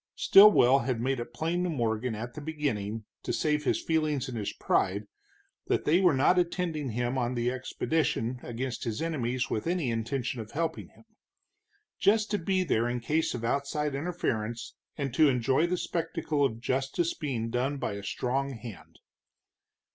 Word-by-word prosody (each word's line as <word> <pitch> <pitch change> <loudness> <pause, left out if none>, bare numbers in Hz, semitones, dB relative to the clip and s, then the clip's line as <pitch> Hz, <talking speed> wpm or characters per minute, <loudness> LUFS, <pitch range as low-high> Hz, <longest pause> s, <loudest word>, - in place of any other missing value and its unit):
Stilwell 165 -11 +7
had 120 -1 -1
made 130 +2 0
it 120 - -6
plain 170 +3 -1
to 180 - 0
Morgan 115 -5 -1
at 120 +3 -6
the 150 - -7
beginning, 115 -9 -3 0.2
to - - -3
save 150 -1 0
his - - +2
feelings 155 -4 0
and 130 - -6
his 105 -3 -2
pride, 100 +3 0 0.6
that - - 0
they 170 +5 +4
were 180 -7 +5
not 160 +7 +4
attending 170 -5 -1
him 120 +3 -1
on 120 0 -1
the 120 +1 0
expedition 130 -1 -1
against 125 +2 -4
his 115 -2 -3
enemies 130 -6 -1
with 110 - -2
any 170 -8 0
intention 120 +2 -2
of 110 - -11
helping 160 +1 -2
him. - - -21 1.0
Just 215 +1 +3
to 205 - +1
be 185 +2 +1
there 120 -8 +1
in 120 0 -2
case 155 +6 0
of 115 -1 -4
outside 140 +3 -1
interference, 125 -8 -3 0.2
and 140 -4 -3
to 155 +2 +5
enjoy 130 +5 +2
the 180 +1 0
spectacle 165 -4 -1
of 115 -5 0
justice 135 +7 0
being 120 -7 -3
done 130 +4 0
by 110 - -2
a 100 - -6
strong 135 +6 -2
hand. 115 -3 -10
135 Hz, 170 wpm, -29 LUFS, 120-160 Hz, 1.0 s, Stilwell